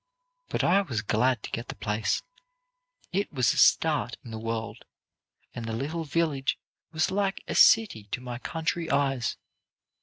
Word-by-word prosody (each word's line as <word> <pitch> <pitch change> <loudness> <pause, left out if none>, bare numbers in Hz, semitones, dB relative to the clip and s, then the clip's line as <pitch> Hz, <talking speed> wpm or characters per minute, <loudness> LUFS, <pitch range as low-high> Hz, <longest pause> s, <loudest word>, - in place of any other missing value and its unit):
But - - -1
I 195 +3 +4
was 120 - -3
glad 115 +2 +1
to - - -7
get 115 - -4
the - - -6
place. 105 +1 -1 0.9
It 200 +2 0
was 125 -7 +2
a - - -6
start - - +3
in 115 - -9
the 110 - -5
world, 115 0 -4 0.7
and 115 - -6
the 110 - -3
little 155 +8 -3
village 150 -3 0 0.3
was 155 -1 0
like 195 0 -1
a - - -2
city 195 - +5
to 105 - -4
my 125 -1 -6
country 165 +3 -2
eyes. 135 -4 0
135 Hz, 160 wpm, -27 LUFS, 115-165 Hz, 0.9 s, city